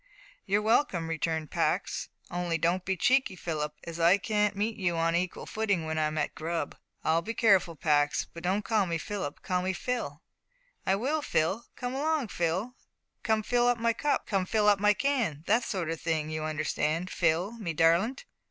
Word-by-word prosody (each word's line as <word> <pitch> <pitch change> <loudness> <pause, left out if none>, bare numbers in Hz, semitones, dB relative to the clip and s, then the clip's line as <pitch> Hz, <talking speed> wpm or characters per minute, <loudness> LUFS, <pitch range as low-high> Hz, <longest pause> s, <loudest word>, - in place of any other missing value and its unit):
"You're 205 +2 +2
welcome," 215 - +2
returned 160 -1 -2
Pax, - - -1 0.2
"only 175 -1 -1
don't 175 +3 +1
be 190 0 -1
cheeky, 260 -1 +3
Philip, 150 -4 -3
as 170 0 -7
I 170 +4 +6
can't 210 0 0
meet 215 +3 -1
you 175 -4 0
on 165 0 +2
an 170 - +3
equal 185 - -5
footing 210 -5 0
w'en 160 0 -2
I'm 155 0 0
at 155 - -1
grub." 165 +1 -3 0.3
"I'll 165 +1 +2
be 225 +5 -5
careful, 190 -7 +4
Pax; 145 -1 +2
but 170 - -11
don't 190 +4 0
call 215 -4 +2
me 170 -1 -1
Philip 175 -4 -5
call 180 -1 0
me 190 +1 -1
Phil." 175 - -3 0.6
"I 190 - +4
will, 280 +9 0
Phil; 195 - 0
come 250 0 -4
along, 290 -3 0
Phil; 180 +8 -1 0.5
`Come 220 -1 +1
fill 245 0 +2
up 245 -1 +3
my 230 0 +1
cup, 290 +5 0
come 195 -3 0
fill 210 0 +2
up 205 -1 +5
my 210 +1 +4
can' 245 - 0
that 230 +3 +2
sort 185 -5 -2
o' 165 - -1
thing 155 -1 -2
you 155 0 -3
understand, 155 +3 -1
Phil, 170 +4 +1
me 180 -6 -2
darlint?" 170 - +2
185 Hz, 190 wpm, -29 LUFS, 165-220 Hz, 0.6 s, I